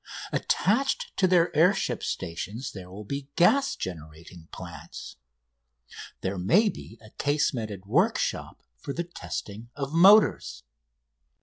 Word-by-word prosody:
Attached 255 Hz, +8 st, 0 dB
to 190 Hz, -, +4 dB
their 175 Hz, -2 st, +3 dB
air 180 Hz, +6 st, +5 dB
ship -, -, -2 dB
stations 100 Hz, +9 st, -4 dB
there 90 Hz, -3 st, -10 dB
will 100 Hz, +3 st, -9 dB
be 140 Hz, +5 st, -6 dB
gas 275 Hz, +11 st, +3 dB
generating 80 Hz, 0 st, -9 dB
plants. 85 Hz, -6 st, -9 dB, 1.0 s
There 95 Hz, 0 st, -3 dB
may 180 Hz, -, +4 dB
be 115 Hz, -, -10 dB
a 110 Hz, -1 st, -16 dB
casemated 115 Hz, -9 st, -1 dB
workshop 180 Hz, -, 0 dB, 0.2 s
for 140 Hz, -, -5 dB
the 170 Hz, -, -2 dB
testing 115 Hz, -9 st, -7 dB
of 140 Hz, 0 st, -4 dB
motors. 195 Hz, +6 st, +5 dB
130 Hz, 120 wpm, -27 LUFS, -, 1.0 s, air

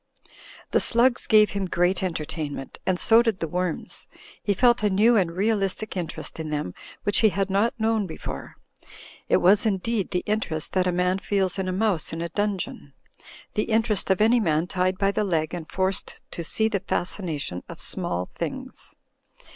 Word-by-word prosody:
The -, -, +4 dB
slugs 245 Hz, +1 st, +2 dB
gave 215 Hz, -1 st, +6 dB
him 200 Hz, -2 st, -2 dB
great 180 Hz, +2 st, +1 dB
entertainment, 155 Hz, -5 st, -4 dB
and 185 Hz, -1 st, +2 dB
so 225 Hz, +1 st, +6 dB
did 225 Hz, -5 st, 0 dB
the 165 Hz, -, -2 dB
worms. 180 Hz, +1 st, -3 dB, 0.3 s
He 200 Hz, -, 0 dB
felt 240 Hz, +3 st, +4 dB
a 210 Hz, -, +2 dB
new 215 Hz, +5 st, +4 dB
and 185 Hz, -6 st, +2 dB
realistic 200 Hz, +2 st, -1 dB
interest 170 Hz, -2 st, -5 dB
in 160 Hz, -1 st, -4 dB
them 145 Hz, -12 st, -3 dB, 0.3 s
which 205 Hz, -, +2 dB
he 220 Hz, -, +5 dB
had 195 Hz, 0 st, -1 dB
not 210 Hz, +5 st, +1 dB
known 220 Hz, -2 st, +1 dB
before; 160 Hz, -, -7 dB, 0.7 s
it -, -, +5 dB
was, 195 Hz, +3 st, +5 dB
indeed, 215 Hz, 0 st, 0 dB
the 180 Hz, -, -1 dB
interest 200 Hz, -7 st, -2 dB
that 185 Hz, -1 st, +2 dB
a -, -, +2 dB
man 180 Hz, +2 st, +1 dB
feels 195 Hz, -1 st, 0 dB
in 190 Hz, -, -1 dB
a -, -, 0 dB
mouse 185 Hz, -5 st, 0 dB
in 165 Hz, -, -4 dB
a 170 Hz, -, -3 dB
dungeon; 195 Hz, -7 st, -3 dB, 0.6 s
the 210 Hz, -, 0 dB
interest 220 Hz, -3 st, 0 dB
of 190 Hz, +1 st, +2 dB
any 230 Hz, +3 st, +5 dB
man 160 Hz, -5 st, +1 dB
tied 185 Hz, +1 st, 0 dB
by 195 Hz, 0 st, +2 dB
the 210 Hz, -, 0 dB
leg 165 Hz, -5 st, 0 dB
and 170 Hz, -3 st, -6 dB
forced 190 Hz, 0 st, -1 dB
to 170 Hz, -, -4 dB
see 220 Hz, +7 st, +1 dB
the 210 Hz, -3 st, -1 dB
fascination 170 Hz, -, -2 dB
of -, -, -9 dB
small 90 Hz, +1 st, -1 dB
things. -, -, -6 dB
190 Hz, 180 wpm, -25 LUFS, 175-215 Hz, 0.7 s, gave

